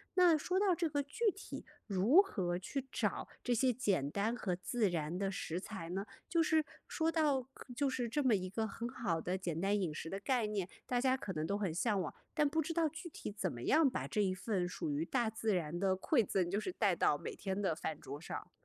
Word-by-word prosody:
那 355 -4 +6
说 365 +5 0
到 390 -3 +4
这 335 -1 0
个 285 -1 +1
具 405 +10 +1
体 400 - -8 0.2
如 215 - +6
何 180 - -2
去 270 +7 -4
找 - - -1
这 245 -1 +1
些 255 +2 +4
简 190 - 0
单 220 +4 0
和 195 -6 -1
自 210 +3 +1
然 165 0 -2
的 195 0 0
食 170 -2 -3
材 190 -4 -6
呢？ 195 +3 -2 0.2
就 335 -2 +3
是 315 -1 +3 0.2
说 325 0 +1
到 300 -5 +2
可 250 - -11
就 280 +3 +1
是 245 -3 -1
这 295 +6 +1
么 240 -5 +5
一 185 -1 -2
个 220 +3 -1
很 230 +3 -4
好 200 -11 -1
的 185 +2 -1
简 170 -3 -3
单 200 +1 +2
饮 160 -5 -1
食 160 - -5
的 195 - -3
概 240 +1 +1
念， 200 -4 -1 0.2
大 245 -1 +1
家 260 0 +3
可 235 -7 -5
能 155 +1 -2
都 200 - 0
很 190 -6 -1
向 200 +2 +1
往， 160 - -4 0.2
但 295 -2 +3
不 320 +2 +1
知 330 +2 -3
道 330 -2 +2
具 320 +4 -8
体 250 - -6
怎 195 -3 -2
么 120 -2 -7
样 305 - +5
把 - - -3
这 210 - +1
一 190 -2 +2
份 185 -1 -1
属 160 - -3
于 150 +3 0
大 240 -1 +1
自 220 -2 0
然 170 0 -2
的 190 -1 +2
馈 235 +2 +3
赠 180 -3 0
就 200 - +1
是 360 - -3
带 200 -5 +3
到 150 -3 +3
每 - - -5
天 195 0 -3
的 185 -5 +2
饭 155 -1 -4
桌 140 +2 -7
上。 165 - -6
210 Hz, 265 characters per minute, -35 LUFS, 180-275 Hz, 0.2 s, 那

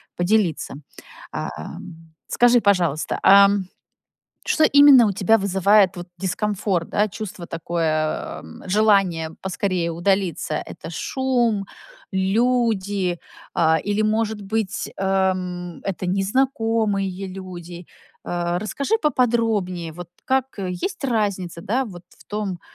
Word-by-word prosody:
поделиться. 180 -2 +1 0.6
А, - - -4
ам, 165 - -10 0.2
скажи, 245 0 +4
пожалуйста, 175 -7 +1
ам, 200 0 +6 0.8
что, 315 - +3
именно, 285 -4 +8
у 200 - 0
тебя 195 +4 +3
вызывает, 195 0 +3
вот, 175 0 -8
дискомфорт, 190 -2 -1
да? 210 +1 +1
Чувство 195 -4 -7
такое, 160 -2 -2
эм, 80 - -13
желание 190 -5 +2
поскорее 185 -2 -1
удалиться? 175 -2 0
Это - - -6
шум, 240 - 0 0.4
люди, 200 -3 +1 0.4
а, 160 -1 +3
или, 205 +3 -1
может 215 0 0
быть, 200 0 -2
эм, 185 -2 -1
это 190 -1 -3
незнакомые 205 -2 0
люди? 180 -2 -9 0.4
А, 175 0 -1
расскажи 275 - -2
поподробнее, 225 - 0
вот 175 +1 -9 0.2
как, 265 -1 +1
э, 190 -2 -3
есть 180 - -4
разница, 200 -8 -1
да, 245 +9 -1
вот 180 -6 -10
в - - -21
том, 205 -4 -4
195 Hz, 115 wpm, -22 LUFS, 175-220 Hz, 0.8 s, именно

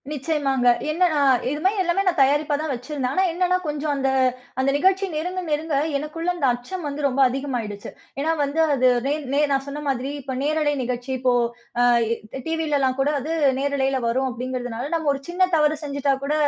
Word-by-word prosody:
நிச்சயமாங்க. 275 -3 0 0.2
ஏன்னா 360 +4 +3 0.4
இது 295 +2 -2
மாதிரி 385 +1 +2
எல்லாமே 360 +2 +1
நான் 355 -4 +1
தயாரிப்பா 290 +2 +3
தான் 315 -2 -2
வச்சிருந்தேன். 255 +1 -3
ஆனா 375 - +3
என்னானா, 365 +1 +1
கொஞ்சம் 300 0 -2
அந்த 270 -1 0 0.5
அந்த 265 +1 +2
நிகழ்ச்சி 380 +5 +3
நெருங்க 360 +4 -2
நெருங்க, 305 0 -1 0.2
எனக்குள்ள 310 +4 -4
அந்த 295 -6 +1
அச்சம் 305 +9 -6
வந்து 290 0 -3
ரொம்ப 270 0 -2
அதிகமாகியிடுச்சி. 245 -6 -4 0.3
ஏன்னா 310 +3 +1
வந்து, 285 +3 -2 0.2
அது 255 -1 +3 0.2
நே 285 - +2 0.2
நே 285 - +3
நான் 270 0 +1
சொன்ன 285 +1 -5
மாதிரி 265 +1 -2
இப்போ 260 -1 -5
நேரலை 300 0 +1
நிகழ்ச்சி 250 +1 -4
இப்போ 250 0 +2 0.5
அ - - +5 0.6
டிவில 320 -2 0
எல்லாம் 260 -1 +1
கூட 285 +2 +2
அது 305 +5 -3 0.3
நேரலையில 275 -1 0
வரும் 260 +3 0
அப்படிங்கிறதுனால, 245 0 -4
நம்ம 320 -3 0
ஒரு 275 - -6
சின்ன 365 +1 +2
தவறு 300 0 +2
செஞ்சிட்டா 280 -1 0
கூட, 290 - 0
285 Hz, 180 wpm, -23 LUFS, 265-315 Hz, 0.6 s, அ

